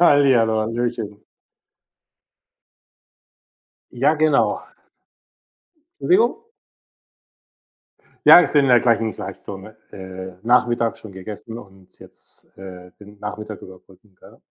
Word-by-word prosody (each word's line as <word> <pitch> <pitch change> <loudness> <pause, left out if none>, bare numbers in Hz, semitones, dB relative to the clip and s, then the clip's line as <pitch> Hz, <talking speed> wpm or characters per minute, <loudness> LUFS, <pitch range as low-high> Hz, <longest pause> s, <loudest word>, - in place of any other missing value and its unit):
Hallihallo, 130 -9 +4
hallöchen. 115 -2 -4 2.7
Ja, 135 +6 +1
genau. 155 -2 +1 1.4
Entschuldigung? 440 +4 +2 1.8
Ja, - - +11
ist 180 - -1
in 145 - +5
in 135 - +1
der 120 -1 +6
gleichen 115 -2 +1
Zeitzone, 100 +2 -9 0.2
äh, 95 0 -9
Nachmittag 120 -1 +1
schon 110 - -12
gegessen 105 +4 -9
und 95 -4 -17
jetzt, - - -13
äh, 90 -2 -11
den 105 0 -16
Nachmittag 105 0 -7
überbrücken, 95 +1 -17
gell? - - -18
110 Hz, 95 wpm, -21 LUFS, 95-125 Hz, 2.7 s, Ja